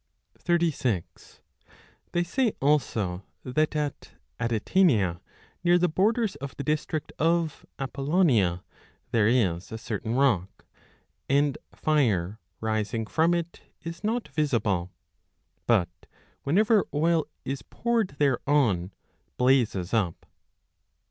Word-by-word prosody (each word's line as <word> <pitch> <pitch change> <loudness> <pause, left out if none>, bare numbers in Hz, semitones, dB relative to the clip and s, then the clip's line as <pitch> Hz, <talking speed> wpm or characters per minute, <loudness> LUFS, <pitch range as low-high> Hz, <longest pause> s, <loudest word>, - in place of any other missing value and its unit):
36 160 - -1 0.7
They 175 - +1
say 230 +6 0
also 110 -10 +1 0.2
that 155 +4 0
at 150 -2 -3 0.3
Atitania, 115 - +2 0.4
near 175 0 +5
the 180 0 +3
borders 215 +5 +1
of 140 -1 -8
the 140 - -4
district 155 0 -2
of 165 0 0
Apollonia, 135 - +1 0.5
there 110 -4 +3
is 95 -8 +1
a 110 - -4
certain 115 0 -3
rock, 115 -9 +1 0.6
and 140 0 +3 0.2
fire 110 - +1 0.2
rising 110 0 -1
from 165 +8 +2
it 170 0 -4 0.2
is 165 +3 -7
not 225 +3 -1
visible, 105 - 0 0.8
but 90 -7 +1 0.3
whenever 210 +7 +3
oil 165 +1 +2 0.2
is 135 +1 -3
poured 230 -9 -1
thereon 130 -9 +2 0.5
blazes 120 -8 +2
up. 95 -7 0
135 Hz, 100 wpm, -27 LUFS, 110-165 Hz, 0.8 s, near